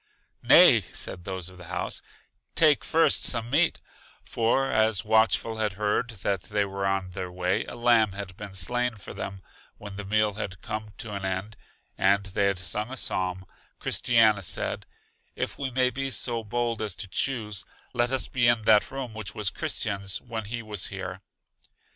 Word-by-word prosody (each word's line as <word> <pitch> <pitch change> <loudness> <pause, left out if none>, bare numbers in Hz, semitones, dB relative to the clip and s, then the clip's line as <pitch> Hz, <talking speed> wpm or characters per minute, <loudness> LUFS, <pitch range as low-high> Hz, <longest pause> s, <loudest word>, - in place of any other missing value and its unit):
Nay, - - +8
said 90 - -5
those 95 -3 -3
of 90 -1 -12
the 90 - -10
house, 90 +1 -3 0.5
take 155 -3 +5
first 165 0 +3
some 115 -1 -1
meat; 160 +4 +3 0.4
for 120 +4 +1
as 110 -1 +2
Watchful 110 +1 +3
had 105 -3 0
heard 105 +4 0
that 100 -3 0
they 105 +1 0
were 100 0 -2
on 95 -1 -1
their 90 0 -5
way, 90 +1 0
a - - -8
lamb 120 -4 +4
had 100 -2 -6
been 100 0 -8
slain 120 +7 +1
for 100 - -10
them 95 -1 -6 0.3
When 100 -1 -9
the 105 - -4
meal 105 +1 +1
had 95 -3 -5
come 110 -1 -5
to 110 -2 -5
an 100 -1 -4
end, 95 +3 -3 0.4
and 100 +1 +3
they 100 +1 0
had 100 -1 0
sung 100 +5 -3
a 130 - -6
psalm, 95 -4 -2 0.3
Christiana 110 -4 +3
said, 95 - -3 0.5
If - - -4
we 135 -2 -1
may 130 0 +2
be 135 +3 -3
so 120 -3 0
bold 115 +1 -1
as 105 -4 -2
to 95 - -7
choose, 105 -2 -1 0.3
let 120 +1 +2
us 130 -1 0
be 120 -2 +2
in 120 -2 +3
that 105 -1 +5
room 130 -4 -5
which 110 -2 -6
was 105 -4 -1
Christian's 100 -1 -2
when 115 -3 -6
he 115 +2 -5
was 105 -3 -3
here. 95 -1 -6
105 Hz, 180 wpm, -27 LUFS, 95-120 Hz, 0.5 s, Nay